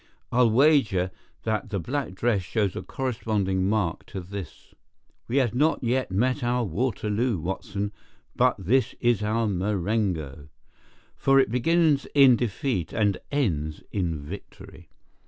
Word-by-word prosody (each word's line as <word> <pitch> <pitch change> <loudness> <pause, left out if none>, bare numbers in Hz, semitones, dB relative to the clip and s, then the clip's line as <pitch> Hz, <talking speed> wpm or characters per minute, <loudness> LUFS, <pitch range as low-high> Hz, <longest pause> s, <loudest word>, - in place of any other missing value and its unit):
I'll 120 -1 +4
wager 115 - +3 0.3
that 110 -1 -2
the 100 - -2
black 130 - -3
dress 110 -1 +1
shows 100 +1 -1
a - - -3
corresponding 105 -7 -1
mark 100 -6 0
to 95 - -6
this. 95 +1 -9 0.5
We 125 - -1
have 125 -5 +2
not 150 +3 +1
yet 125 +2 0
met 125 +8 0
our 120 0 +1
Waterloo, 110 +2 -1
Watson, 100 +4 -3 0.4
but 125 0 +3
this 115 +8 +1
is 120 -3 +2
our 110 +2 0
Marengo, 95 -7 -1 0.7
for 135 0 +4
it 130 - +2
begins 155 +3 +2
in 135 -3 +8
defeat 115 - -2
and 105 -3 +1
ends 80 - -1
in 85 -6 -1
victory. 95 +3 -11
110 Hz, 135 wpm, -26 LUFS, 95-125 Hz, 0.7 s, in